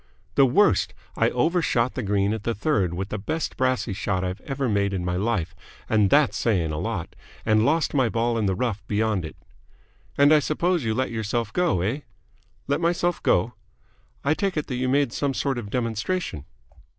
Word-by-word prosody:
"The 135 Hz, -, +5 dB
worst. 200 Hz, +12 st, +3 dB, 0.2 s
I -, -, +3 dB
over 170 Hz, +2 st, +1 dB
shot 120 Hz, -5 st, +1 dB
the -, -, -3 dB
green 100 Hz, -1 st, +1 dB
at 110 Hz, -, -4 dB
the 115 Hz, +2 st, -2 dB
third 100 Hz, -, 0 dB
with 95 Hz, +3 st, -4 dB
the 105 Hz, -, -3 dB
best 155 Hz, +11 st, -3 dB
brassey 130 Hz, -4 st, 0 dB
shot 95 Hz, -1 st, -1 dB
I've 90 Hz, +2 st, -4 dB
ever 135 Hz, -2 st, -2 dB
made 100 Hz, -2 st, +1 dB
in 90 Hz, -1 st, -3 dB
my 90 Hz, 0 st, -1 dB
life 100 Hz, -3 st, -1 dB, 0.3 s
and 105 Hz, -3 st, +3 dB
that's 145 Hz, +3 st, +4 dB
saying 90 Hz, -9 st, +1 dB
a 75 Hz, -, -3 dB
lot -, -, -4 dB, 0.3 s
and 110 Hz, 0 st, +3 dB
lost 160 Hz, +2 st, +1 dB
my 130 Hz, -5 st, +2 dB
ball 115 Hz, +1 st, 0 dB
in 105 Hz, -, +1 dB
the 95 Hz, -, +1 dB
rough 110 Hz, -2 st, -2 dB
beyond 105 Hz, -4 st, 0 dB
it." 80 Hz, -, -8 dB, 0.8 s
"And 145 Hz, +2 st, +6 dB
I 155 Hz, -, +6 dB
suppose 170 Hz, +2 st, 0 dB
you 110 Hz, -1 st, 0 dB
let 130 Hz, +1 st, -1 dB
yourself 110 Hz, 0 st, -2 dB
go, 175 Hz, -, +1 dB
eh?" 110 Hz, +10 st, -1 dB, 0.7 s
"Let 145 Hz, +3 st, 0 dB
myself 175 Hz, 0 st, +1 dB
go?" -, -, +2 dB, 0.7 s
"I 140 Hz, -, +3 dB
take 195 Hz, +1 st, -1 dB
it 150 Hz, -, -1 dB
that 125 Hz, -, -4 dB
you 130 Hz, +1 st, 0 dB
made 140 Hz, -2 st, +2 dB
some 140 Hz, -2 st, -1 dB
sort 135 Hz, -2 st, -1 dB
of 105 Hz, -4 st, -7 dB
demonstration?" 115 Hz, -, -2 dB
115 Hz, 200 wpm, -24 LUFS, 100-145 Hz, 0.8 s, And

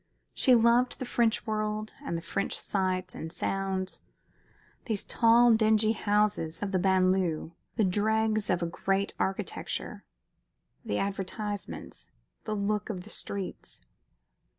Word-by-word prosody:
She 255 Hz, -, +5 dB
loved 235 Hz, +2 st, +4 dB
the 255 Hz, -, -4 dB
French 235 Hz, -2 st, +1 dB
world 215 Hz, 0 st, -2 dB
and 170 Hz, -, -2 dB
the 165 Hz, -, -7 dB
French 200 Hz, +4 st, -2 dB
sights 185 Hz, -2 st, -1 dB
and 160 Hz, -, -6 dB
sounds 190 Hz, 0 st, -2 dB, 0.8 s
these 220 Hz, -5 st, -1 dB
tall, 235 Hz, 0 st, +5 dB
dingy 220 Hz, 0 st, +4 dB
houses 205 Hz, -6 st, 0 dB
of 200 Hz, -, -2 dB
the 185 Hz, -, +2 dB
banlieue, 185 Hz, -3 st, +2 dB, 0.2 s
the 225 Hz, -, +2 dB
dregs 215 Hz, +2 st, +1 dB
of 175 Hz, -1 st, +1 dB
a -, -, +1 dB
great 195 Hz, +3 st, -1 dB
architecture; 195 Hz, 0 st, -3 dB, 0.8 s
the 105 Hz, -, -2 dB
advertisements; 200 Hz, -, -4 dB, 0.4 s
the 215 Hz, -, -2 dB
look 210 Hz, 0 st, -1 dB
of 185 Hz, -5 st, -4 dB
the 215 Hz, -, -8 dB
streets. 195 Hz, -2 st, -4 dB
205 Hz, 130 wpm, -29 LUFS, 185-220 Hz, 0.8 s, She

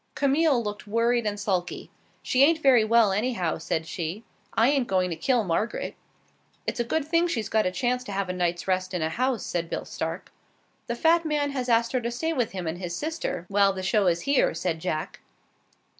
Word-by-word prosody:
Camille 280 Hz, -2 st, +2 dB
looked 210 Hz, 0 st, -6 dB
worried 230 Hz, +1 st, +1 dB
and 205 Hz, 0 st, -2 dB
sulky. 185 Hz, -4 st, -2 dB, 0.3 s
"She 255 Hz, +2 st, +3 dB
ain't 325 Hz, +3 st, +5 dB
very 255 Hz, -5 st, +6 dB
well, 225 Hz, -1 st, +4 dB
anyhow," 200 Hz, -5 st, -1 dB
said 160 Hz, 0 st, -2 dB
she. 170 Hz, +5 st, -4 dB, 0.3 s
"I 225 Hz, -, +4 dB
ain't 275 Hz, -4 st, +1 dB
going 185 Hz, -2 st, +1 dB
to -, -, -2 dB
kill 240 Hz, +8 st, +1 dB
Margaret." 195 Hz, +5 st, -2 dB, 0.7 s
"It's -, -, -3 dB
a -, -, +2 dB
good 290 Hz, +5 st, -1 dB
thing 335 Hz, +2 st, +2 dB
she's 225 Hz, -, -2 dB
got 220 Hz, -3 st, +2 dB
a -, -, -1 dB
chance 250 Hz, +6 st, -1 dB
to 205 Hz, -, -6 dB
have 195 Hz, -1 st, -1 dB
a 180 Hz, -, -2 dB
night's 175 Hz, -1 st, -1 dB
rest 185 Hz, 0 st, 0 dB
in 170 Hz, -, -1 dB
a 160 Hz, -, 0 dB
house," 250 Hz, +4 st, -1 dB
said 170 Hz, -1 st, -3 dB
Bill -, -, -4 dB
Stark. -, -, -5 dB, 0.6 s
"The 235 Hz, -, -2 dB
fat 330 Hz, +6 st, +3 dB
man 295 Hz, -2 st, 0 dB
has 255 Hz, -2 st, -3 dB
asked 230 Hz, 0 st, +3 dB
her 255 Hz, -, 0 dB
to 235 Hz, -, -2 dB
stay 320 Hz, +8 st, -2 dB
with 245 Hz, -6 st, 0 dB
him 185 Hz, -2 st, -4 dB
and 165 Hz, +2 st, -3 dB
his 175 Hz, -2 st, -4 dB
sister 310 Hz, -, -3 dB
while 200 Hz, -1 st, +3 dB
the 190 Hz, -1 st, -5 dB
show 200 Hz, 0 st, +2 dB
is 170 Hz, -1 st, +2 dB
here," 280 Hz, -, +2 dB
said 165 Hz, -1 st, -2 dB
Jack. 155 Hz, -2 st, -3 dB
220 Hz, 215 wpm, -26 LUFS, 180-255 Hz, 0.7 s, very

